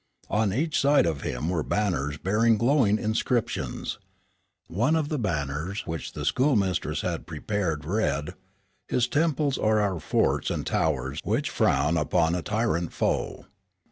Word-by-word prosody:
On 105 -2 +2
each 150 - 0
side 140 -4 +4
of 80 -4 -1
him 65 +6 -3
were 85 -2 0
banners 75 -7 -1
bearing 110 +6 +2
glowing 120 -3 +3
inscriptions. 110 - -1 0.7
One 120 - +1
of 155 -2 0
the 150 - -1
banners 80 - -2
which 80 -3 -5
the - - -5
schoolmistress 115 -9 +1
had - - -3
prepared 85 -9 -2
read: 75 -6 -1 0.5
"His 120 -1 +1
temples 150 -1 +1
are 110 0 +3
our 100 -4 0
forts - - +1
and - - -2
towers 70 -2 0
which - - -1
frown 75 +5 +2
upon 80 +1 +2
a 90 - -1
tyrant 85 +2 -1
foe." - - -1
100 Hz, 140 wpm, -26 LUFS, 80-120 Hz, 0.7 s, side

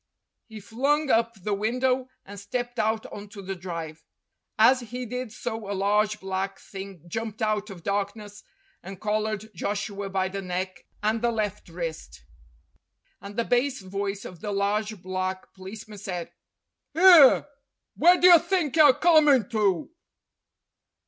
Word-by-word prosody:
He 220 -2 -10
flung 275 +8 0
up 230 0 +2
the 210 - -1
window 250 +5 0 0.2
and 200 0 -10
stepped 245 +4 -4
out 220 0 0
on 205 0 -9
to 200 0 -10
the 195 +1 -4
drive. 165 -3 -7 0.5
As 240 +4 +6
he 245 +1 -6
did 250 0 -5
so 220 -2 -5
a - - -1
large 210 +2 +1
black 190 +1 -3
thing 195 -4 -10
jumped 220 +4 -5
out 215 -1 -1
of 180 -4 -10
darkness 205 +1 -3 0.4
and 195 -1 -9
collared 215 0 -2
Joshua 200 +2 -4
by 190 -1 0
the 195 +1 -5
neck 185 0 -5 0.2
and 220 +1 +1
the 240 - +2
left 210 -5 -3
wrist. 165 - -6 1.0
And 200 +1 -9
the 235 - 0
bass 250 0 +1
voice 195 +1 -4
of 175 -3 -10
the 210 - -4
large 205 0 -1
black 185 0 -4
policeman 205 +2 -10
said: 180 -4 -5 0.3
" - - -53
'Ere, 335 -7 +8 0.5
where 350 +4 +5
do - - +3
you 350 -2 +9
think 340 -6 -1
you're 295 -4 +7
comin' 300 - +4
to?" 210 - 0
210 Hz, 150 wpm, -26 LUFS, 195-240 Hz, 1.0 s, you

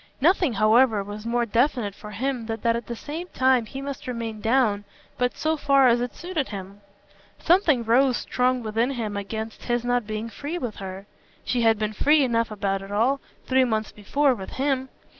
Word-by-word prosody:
Nothing, 335 - +3
however, 215 +1 +4
was 205 +2 -7
more 240 0 +1
definite 235 -2 +1
for 210 - -11
him 240 +2 -3
than 225 -1 -4
that 230 0 +2
at 235 -2 -5
the 235 - -4
same 315 +9 -6
time 260 -3 +3
he 270 +5 -7
must 275 -2 -6
remain 230 -3 -4
down 225 -3 +2 0.4
but 250 0 0
so 315 0 +1
far 275 -2 +4
as 240 0 +3
it 245 - -4
suited 345 -5 -3
him. 200 0 -8 0.6
Something 330 - +3
rose 250 +3 +3
strong 250 0 0
within 225 +3 0
him 225 -6 -3
against 220 +2 -5
his 240 0 0
not 245 -2 0
being 215 +1 -3
free 290 +8 -5
with 245 -10 -5
her. 190 0 -7 0.4
She 245 - 0
had 225 -1 +4
been 215 0 -2
free 295 +6 +4
enough 230 -2 +1
about 195 -2 -2
it 195 +1 -9
all, 240 +7 +2 0.3
three 260 0 +3
months 220 -3 -1
before, 270 +7 +1
with 195 -5 -8
HIM. 265 -1 -1
235 Hz, 195 wpm, -25 LUFS, 215-265 Hz, 0.6 s, however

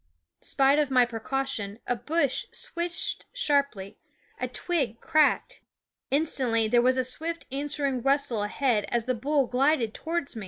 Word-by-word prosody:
Spite 275 +2 +3
of 295 -2 +1
my 250 -2 +5
precaution, 235 -3 -3
a 245 - 0
bush 290 +2 0
swished 345 0 -3
sharply; 280 - -1 0.4
a - - -1
twig 275 - -1
cracked. 305 -2 +2 0.5
Instantly 260 -6 +2
there 240 +2 +4
was 255 +1 +3
a 255 - +2
swift 325 +6 -2
answering 280 -2 -1
rustle 270 -4 +1
ahead 215 +1 0
as 235 -2 -1
the 255 - 0
bull 275 +4 +1
glided 255 -2 +1
towards 330 -4 -3
me. - - -5
270 Hz, 145 wpm, -27 LUFS, 240-295 Hz, 0.5 s, my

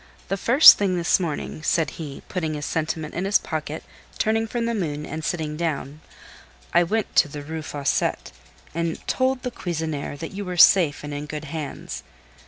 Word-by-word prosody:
"The 195 - +1
first 240 +9 +8
thing 190 -3 +1
this 170 +2 +3
morning," 155 -2 -4
said 155 -1 +1
he, 150 -4 -8
putting 160 -4 -2
his 145 -1 -4
sentiment 160 -1 -2
in 180 - -2
his 200 +1 +4
pocket, 155 -1 -5 0.3
turning 225 +1 +1
from 235 +1 -2
the 235 - 0
moon, 150 -8 -3
and 155 +2 -6
sitting 155 -3 -2
down, 155 -2 -3 0.7
"I - - +6
went 210 +5 -1
to 160 - +6
the 145 0 -7
Rue 160 +2 -5
Fossette, 145 -2 -1 0.4
and 170 0 -3
told 260 0 +1
the 250 - -3
cuisinière 160 -7 -4
that 165 +2 -6
you 200 +1 -5
were 180 -2 -5
safe 170 -5 +6
and 145 0 -5
in 145 +1 -5
good 150 0 -6
hands. 155 -1 -6
160 Hz, 185 wpm, -24 LUFS, 150-190 Hz, 0.7 s, first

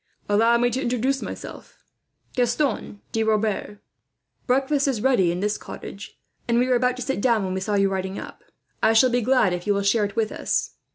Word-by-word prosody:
"Allow 225 +3 +4
me 245 +1 +2
to 260 +3 -2
introduce 255 +2 0
myself, - - -9 0.5
first 245 -2 +1
Gaston 275 -8 -2
de 225 - 0
Rebers. 215 -1 -1 0.7
Breakfast 275 +2 +2
is 260 -5 0
ready 210 -8 +3
in 175 +2 -3
this 210 +1 -1
cottage, 200 +2 -9 0.3
and 235 0 +2
we 250 +1 +3
were 255 - +2
about 250 0 +2
to 255 - -5
sit 270 -7 -2
down 230 -4 +2
when 185 - -3
we 190 - -1
saw 205 +2 -1
you 195 0 +3
riding 190 0 -3
up. - - -9 0.4
I 225 - +4
shall 250 +3 +5
be 245 0 +2
glad 235 -6 +3
if 180 +2 -5
you 205 - +3
will 200 - 0
share 205 +2 +2
it 205 +1 -6
with 220 -2 0
us. - - -1
225 Hz, 215 wpm, -24 LUFS, 205-250 Hz, 0.7 s, shall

